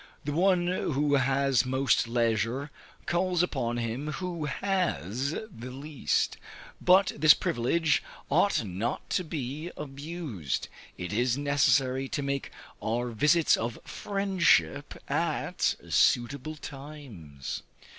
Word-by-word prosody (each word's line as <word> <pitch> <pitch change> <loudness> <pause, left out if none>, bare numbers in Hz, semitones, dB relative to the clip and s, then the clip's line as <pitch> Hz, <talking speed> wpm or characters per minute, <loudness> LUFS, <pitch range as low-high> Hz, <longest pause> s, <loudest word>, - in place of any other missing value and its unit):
The 145 - -2
one 180 +2 +3
who 150 -5 0
has 135 -1 +3
most 130 -2 +2
leisure, 115 +4 0 0.3
calls 180 +2 +1
upon 120 -8 -1
him 120 +6 -3
who 175 -4 -4
has 140 - -1 0.2
the 120 +3 -8
least; 140 +2 -1 0.4
but 185 +2 +5
this 150 0 +7
privilege 150 +7 +1 0.3
ought 165 -1 +3
not 100 +5 -3
to 185 - +1
be 150 0 -4
abused: 140 - -4 0.3
it 90 +2 -5
is 120 +3 +1
necessary 135 -2 +2
to 145 -2 -2
make 140 0 -2 0.3
our 120 +2 -1
visits 150 +8 +4
of 115 0 -3
friendship 175 - +1
at - - 0
suitable 140 +5 +2
times. 135 - -8
140 Hz, 110 wpm, -28 LUFS, 120-155 Hz, 0.4 s, this